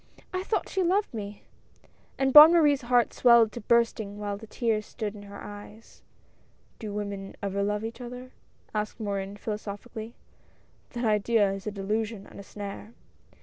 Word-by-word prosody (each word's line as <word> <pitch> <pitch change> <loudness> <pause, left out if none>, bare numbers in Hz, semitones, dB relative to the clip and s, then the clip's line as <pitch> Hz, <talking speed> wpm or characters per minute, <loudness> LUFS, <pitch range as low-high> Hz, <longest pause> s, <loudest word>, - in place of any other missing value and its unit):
I 370 - -1
thought 425 - -1
she 385 - -1
loved 375 +1 +1
me!" 205 -2 -7 0.7
and 270 -1 +1
Bonne 305 +3 +11
Marie's 295 -5 +4
heart 245 -1 +2
swelled 235 -3 +5
to 240 - -7
bursting 220 -2 +1
while 205 -1 -3
the 220 +2 -11
tears 220 -1 -1
stood 210 -2 -5
in 205 - -11
her 200 0 -10
eyes. 205 +2 -12 0.8
"Do 215 -3 -6
women 200 -1 -5
ever 200 0 -1
love 210 +2 -1
each 230 +3 -7
other?" 250 +1 -8 0.4
asked 215 +2 -3
Morin 200 -1 -3
philosophically, 215 +2 -6 0.2
— - - -34
" - - -36
that 240 0 -2
idea 210 -1 +3
is 195 +1 -7
a - - -1
delusion 210 +1 -3
and - - -13
a - - -8
snare." 205 +2 -8
215 Hz, 170 wpm, -27 LUFS, 205-240 Hz, 0.8 s, Bonne